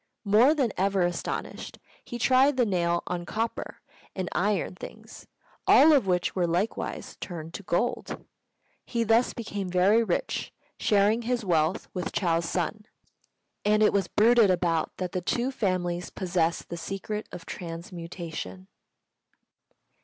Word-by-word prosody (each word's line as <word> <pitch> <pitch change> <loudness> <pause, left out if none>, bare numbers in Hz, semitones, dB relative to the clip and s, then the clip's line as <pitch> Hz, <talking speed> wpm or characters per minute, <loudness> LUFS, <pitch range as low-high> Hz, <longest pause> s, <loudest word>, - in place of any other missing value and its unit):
More 225 +9 +5
than 255 -8 0
ever 195 0 +2
astonished, 175 -1 -4 0.3
he 240 - -6
tried 260 +3 +4
the 245 - +4
nail 175 -4 0
on 175 -1 -3
copper 225 +6 -4 0.3
and 185 -2 -3
iron 200 0 0
things, 180 - -11 0.4
all 315 +2 +7
of 265 -9 +3
which 180 -1 0
were 180 -2 +1
likewise 180 +6 -2
turned 165 -2 -6
to - - -6
gold. 200 +6 -2 0.6
He 235 -1 -1
thus 230 +2 +3
became 205 -5 -4
very 190 +6 +4
rich, - - -2 0.3
sharing 210 +2 +3
his 240 -1 -1
wealth 165 +2 +1
with 180 -2 -4
Chou's 170 -3 +1
son; 210 +5 -2 0.8
and 215 +1 +3
it - - +4
was 195 -3 +1
bruited 225 +1 +5
about 175 -3 0
that 180 -1 -3
the 185 - -2
two 240 +8 -1
families 180 -7 -1
possessed 175 -3 -1
the 170 - -5
secret 195 +5 -5
of 170 - -9
transmutation. 170 +1 -7
190 Hz, 140 wpm, -27 LUFS, 175-225 Hz, 0.8 s, all